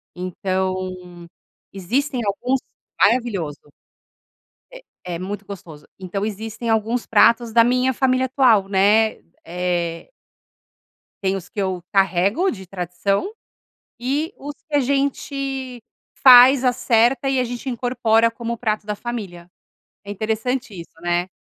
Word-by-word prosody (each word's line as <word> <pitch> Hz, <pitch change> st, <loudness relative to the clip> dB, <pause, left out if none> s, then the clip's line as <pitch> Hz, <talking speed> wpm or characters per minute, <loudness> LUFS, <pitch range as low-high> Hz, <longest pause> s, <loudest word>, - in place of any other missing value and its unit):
Então 185 Hz, +1 st, -2 dB, 1.0 s
existem 245 Hz, +8 st, -1 dB
alguns 245 Hz, +7 st, 0 dB, 0.4 s
maravilhoso. 200 Hz, -, 0 dB, 1.0 s
É -, -, -12 dB, 0.2 s
é 170 Hz, -2 st, -4 dB
muito 200 Hz, +2 st, -6 dB
gostoso. 165 Hz, -7 st, -11 dB
Então 195 Hz, +2 st, -4 dB
existem 220 Hz, +2 st, -5 dB
alguns 225 Hz, +2 st, 0 dB
pratos 230 Hz, -1 st, +3 dB
da 230 Hz, 0 st, +6 dB
minha 250 Hz, +2 st, +2 dB
família 255 Hz, 0 st, +1 dB
atual, 245 Hz, -7 st, +3 dB
né? 205 Hz, +3 st, +3 dB, 0.3 s
Eh 175 Hz, -1 st, -3 dB, 1.1 s
Tem 190 Hz, 0 st, +1 dB
os 185 Hz, -2 st, -7 dB
que -, -, -7 dB
eu 185 Hz, -2 st, -2 dB
carrego 195 Hz, -, +2 dB
de 190 Hz, -4 st, -9 dB
tradição 195 Hz, -, -2 dB, 0.7 s
e 285 Hz, +8 st, -2 dB
os 290 Hz, +1 st, -7 dB
que 305 Hz, -, -2 dB
a -, -, +5 dB
gente 275 Hz, -1 st, -2 dB, 0.4 s
faz, 255 Hz, +1 st, +9 dB
acerta 250 Hz, +1 st, +2 dB
e 270 Hz, -1 st, +1 dB
a -, -, +2 dB
gente 245 Hz, +2 st, -5 dB
incorpora 235 Hz, -2 st, +1 dB
como 235 Hz, 0 st, -5 dB
o -, -, -6 dB
prato 215 Hz, -2 st, -2 dB
da 210 Hz, 0 st, -3 dB
família. 200 Hz, -7 st, -7 dB, 0.6 s
É 200 Hz, -, -6 dB
interessante 220 Hz, +4 st, -2 dB
isso, 170 Hz, -, -11 dB
né? 175 Hz, +1 st, 0 dB
225 Hz, 125 wpm, -21 LUFS, 190-255 Hz, 1.1 s, faz